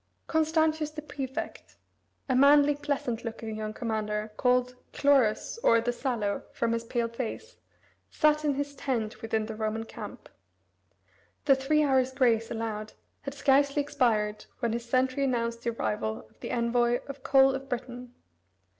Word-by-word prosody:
Constantius 315 -1 +1
the 305 0 -8
prefect 270 -3 -6 0.5
a 260 - +1
manly, 285 +2 +6
pleasant 280 -5 -2
looking 225 -1 -5
young 215 0 -4
commander, 215 -2 -3
called 250 0 +2 0.2
Chlorus 275 - +2
or 230 - +5
"the 240 +1 -1
sallow," 235 -6 -2
from 230 -1 0
his 230 0 -1
pale 235 0 -1
face, 255 - -6 0.5
sat 305 -1 +2
in 290 -2 +1
his 285 +1 -3
tent 245 -5 -3
within 220 -1 -1
the 220 - -6
Roman 220 +1 -2
camp. - - -9 1.2
The 275 - +7
three 285 +3 +2
hours' 260 -2 +2
grace 235 -4 +2
allowed 215 -2 -4 0.3
had 275 0 -6
scarcely 280 +1 +3
expired 220 -7 0
when 235 -3 -1
his 235 0 -3
sentry 255 +2 +1
announced 235 -3 -1
the 235 - -1
arrival 110 - -2
of - - -30
the - - -6
envoy 240 +1 +1
of 275 -1 -8
Coel 270 0 +5
of 270 0 -6
Britain. 245 0 -6
250 Hz, 150 wpm, -28 LUFS, 225-280 Hz, 1.2 s, The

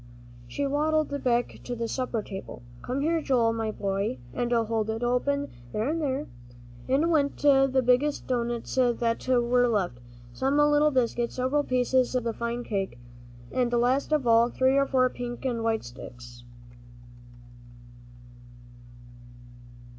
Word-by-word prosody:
She 280 - -3
waddled 295 0 0
back 240 -1 0
to 245 - -4
the 230 0 -3
supper 245 -2 -2
table. 195 -10 -8 0.2
"Come 260 +3 -3
here, 325 +2 +1
Joel, 240 -6 +2
my 225 -1 -2
boy, 195 -7 -2 0.2
and 240 0 -2
hold 225 -2 0
it 225 +2 -3
open 280 +4 0 0.2
there 215 +3 -1
and 325 +1 -1
there." 280 0 -1 0.6
In 295 +6 +2
went 285 -3 +1
the 270 -2 +4
biggest 255 +4 +2
doughnuts 240 -2 -2
that 240 -2 +1
were 245 -1 +3
left, 190 - -1 0.3
some 270 - 0
little 295 0 +4
biscuits, 240 -3 0
several 260 +3 +1
pieces 255 0 +1
of 250 - +1
the 230 -1 -2
fine 235 +1 -3
cake, 195 - -3 0.5
and 245 -2 0
last 245 +5 +1
of 300 -4 +1
all, 230 0 +5
three 260 +2 +2
or 275 0 +3
four 255 -2 +3
pink 245 0 -6
and 235 -3 -1
white 225 -1 0
sticks. 120 0 -11
245 Hz, 140 wpm, -27 LUFS, 230-275 Hz, 0.6 s, all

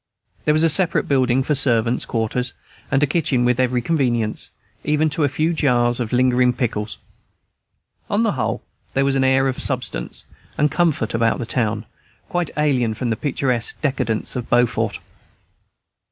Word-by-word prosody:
There 150 - +3
was 155 - +3
a 165 - +5
separate 175 +3 +2
building 130 -2 +2
for 150 - 0
servants' 120 -3 +2
quarters, 120 +2 -2 0.4
and 135 +1 +2
a - - +6
kitchen 140 -5 0
with 125 0 +1
every 125 -1 +1
convenience, 120 -8 -1 0.3
even 150 +1 +1
to 150 +1 0
a 145 - +3
few 155 +5 0
jars 120 -6 +2
of 115 -3 -3
lingering 125 0 +3
pickles. 110 -3 -3 1.1
On 205 +3 +1
the 220 - +2
whole, 130 - -2 0.3
there 135 +1 +2
was 135 - +2
an 135 - +2
air 130 0 +3
of 130 - -2
substance 130 -3 -3 0.3
and 150 0 +2
comfort 160 -10 0
about 115 0 +1
the 120 - -4
town, 110 -2 -1 0.4
quite 175 -3 -1
alien 130 -7 +1
from 120 +1 -2
the - - +1
picturesque 125 -2 -1
decadence 130 -6 -1
of 125 -2 -4
Beaufort. 120 -2 +1
130 Hz, 165 wpm, -21 LUFS, 120-145 Hz, 1.1 s, a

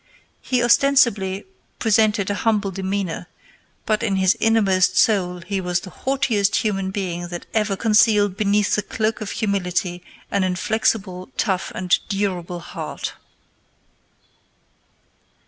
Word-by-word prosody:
He 250 -2 0
ostensibly 235 -7 +3 0.3
presented 215 -2 +2
a 205 - -3
humble 210 -3 +1
demeanor, 190 -2 -3 0.6
but 215 -2 +1
in 210 -4 0
his 190 +2 +3
innermost 195 -5 +3
soul 180 -5 +2
he 190 +3 -3
was 180 -1 -1
the 185 - -10
haughtiest 230 -7 0
human 195 -3 0
being 180 -3 -3
that 175 0 -7
ever 210 -2 +1
concealed 210 -2 +3
beneath 205 0 +1
the 210 - +2
cloak 220 +2 -2
of 210 - -4
humility 180 -3 -1 0.3
an 200 -1 +1
inflexible, 185 0 -1
tough, 190 -4 -1
and 180 -1 -1 0.2
durable 180 -4 -2
heart. - - -6
200 Hz, 120 wpm, -21 LUFS, 185-215 Hz, 0.6 s, ostensibly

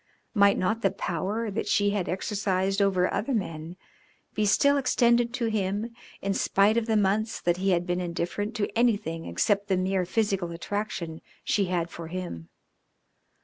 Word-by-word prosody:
Might 200 -2 +5
not 220 +5 0
the 195 - +3
power 195 +4 -2
that 205 - -3
she 205 -1 +2
had 200 -3 -1
exercised 195 0 0
over 185 -2 +2
other 255 +3 -1
men 165 -4 -4 0.6
be 210 0 +1
still 280 +7 +4
extended 240 -3 +3
to 240 - -1
him 215 +1 -1 0.3
in 195 0 0
spite 200 +2 +3
of 235 -1 0
the 220 -1 +2
months 210 +2 +1
that 175 0 +1
he 195 +1 0
had 175 -1 +2
been 175 0 -1
indifferent 175 +5 -3
to 205 -2 -2
anything 210 -9 +1
except 200 - +1
the 190 - +1
mere 185 0 0
physical 195 -4 0
attraction 170 -2 -4 0.2
she 200 - +1
had 175 -2 -1
for 165 -1 -7
him? 165 - -6
195 Hz, 165 wpm, -27 LUFS, 180-215 Hz, 0.6 s, Might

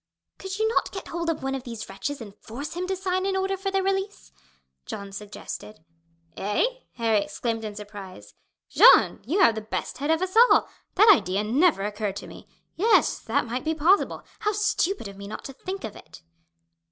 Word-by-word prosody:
"Could 385 0 -5
you 440 +1 +2
not 450 - 0
get 385 - -7
hold 340 0 -2
of 325 - -2
one 270 0 -1
of 270 - -3
these 235 -3 -7
wretches 280 +7 -5
and 205 -3 -10
force 270 +7 -7
him 360 +2 -3
to 380 - -1
sign 370 0 -1
an 390 - 0
order 385 0 0
for 390 +1 -3
their 390 0 0
release?" 385 - -2 0.6
Jeanne 200 -1 -6
suggested. 210 -2 -8 0.5
"Eh!" 205 - +1 0.3
Harry 225 -3 +2
exclaimed 225 +3 -3
in 210 -1 -5
surprise. 195 - -10 0.3
"Jeanne, - - +6
you 365 +9 +2
have 275 -11 +6
the 220 - -4
best 220 +3 -5
head 290 +2 -2
of 320 +3 +2
us 375 +2 -4
all. 475 +2 +6 0.3
That 425 +3 +8
idea 195 - 0
never 255 - +3
occurred 205 -1 -3
to - - -7
me. - - -12 0.3
Yes, 435 +6 +3
that - - 0
might 245 +2 -3
be 320 +1 -1
possible. 340 +6 +2 0.2
How 420 -1 0
stupid 405 - 0
of 200 0 -10
me 200 0 -8
not 215 - -7
to 270 - -7
think 375 +8 -6
of 215 - -6
it!" 155 - -14
270 Hz, 200 wpm, -25 LUFS, -, 0.6 s, That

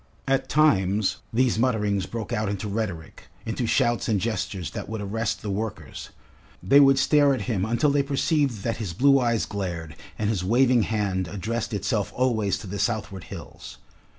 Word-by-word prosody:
At 135 0 +1
times 105 -9 +2
these 120 -1 +2
mutterings 105 -6 +1
broke 115 -2 -5
out 105 -1 -1
into 100 +1 -3
rhetoric, 100 -6 -5 0.2
into 115 +1 -2
shouts 120 -1 +1
and 105 -3 +2
gestures 95 -4 -3
that - - -6
would 110 0 -4
arrest 105 +2 -3
the 105 - -3
workers; 100 -7 -5 0.5
they 140 +2 +6
would 135 -1 +6
stare 145 0 +4
at 125 - -5
him 100 -4 -1
until 120 +6 +2
they 145 0 +3
perceived 140 - 0
that 115 - -1
his 105 -7 -4
blue 135 +8 +4
eyes 115 -3 +1
glared 85 -6 -5 0.2
and 105 - -1
his 95 -5 -2
waving 120 +4 +3
hand 100 -4 -1
addressed 110 +6 -3
itself 105 0 -1
always 110 -7 +1
to 100 - -10
the 100 +2 -5
southward 105 -3 -2
hills. - - -10
110 Hz, 175 wpm, -25 LUFS, 100-125 Hz, 0.5 s, they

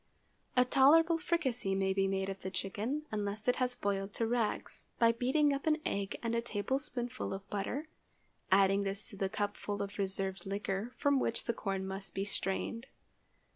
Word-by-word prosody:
A 250 - +7
tolerable 320 +6 +6
fricassee 260 - 0
may 190 0 +2
be 195 0 +2
made 195 0 0
of 195 0 -5
the 190 - -3
chicken, 210 +10 -2
unless 210 +1 -3
it 250 - +3
has 250 -1 0
boiled 200 -3 -2
to 230 - +1
rags, 230 -1 -1
by 230 -1 +6
beating 265 +5 +2
up 275 +2 -3
an 305 -1 +4
egg 200 -1 -1
and 230 0 0
a 235 - +2
tablespoonful 245 +2 -2
of 195 +1 -5
butter, 225 +10 -2 0.6
adding 195 +1 +5
this 200 +1 -2
to 215 - -9
the 195 -1 -1
cupful 205 0 -2
of 200 +1 -4
reserved 195 -1 -2
liquor 200 +3 -2
from 285 -2 +3
which 230 - 0
the 235 - 0
corn 195 -3 -2
must 190 +1 -6
be 195 - -1
strained. 205 +5 -2
205 Hz, 175 wpm, -33 LUFS, 195-250 Hz, 0.6 s, A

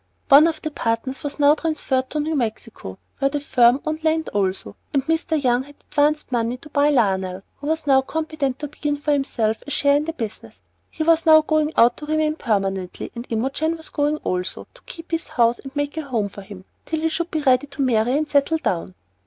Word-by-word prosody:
One 290 +3 +8
of 320 -1 -3
the 310 - -3
partners 240 +1 -2
was 290 -1 -3
now 290 0 +6
transferred 295 -5 -1
to 305 - -3
New 310 +2 -1
Mexico, 220 - -4 0.2
where 275 0 +2
the 290 +1 -2
firm 250 -2 +4
owned 310 0 -3
land 320 0 +1
also, 195 -2 -2 0.2
and 275 -1 +1
Mr. 320 0 0
Young 250 -2 +2
had 285 +2 -13 0.2
advanced 295 -1 +1
money 240 0 0
to 300 +4 -14
buy 290 +1 +3
Lionel, 190 -8 +1
who 285 - -7
was 320 0 -1
now 270 -2 +5
competent 310 -2 -3
to 295 - -5
begin 295 0 -3
for 295 +1 -1
himself, 235 -6 0
a - - -5
share 285 0 +3
in 295 - -1
the 325 - -3
business. 225 -9 -7 0.3
He 315 - -3
was 330 +1 +3
now 315 0 +8
going 310 0 +1
out 235 +1 +5
to 300 - -8
remain 310 0 +1
permanently, 195 - -2
and 235 +1 -7
Imogen 270 +8 -1
was 320 - -11
going 295 +1 0
also, 180 0 -3
to - - -19
keep 330 -1 -10
his 330 0 -2
house 235 0 +2
and 270 +1 -11
make 290 +1 -2
a - - 0
home 235 -8 -2
for 200 - -10
him 195 -1 -11 0.2
till 320 -1 -2
he 320 - +1
should 340 +2 -2
be 310 -2 -2
ready 260 0 +3
to 275 0 -3
marry 245 +1 +2
and 305 0 -1
settle 290 +2 +2
down. 185 - -3
285 Hz, 220 wpm, -22 LUFS, 235-310 Hz, 0.3 s, One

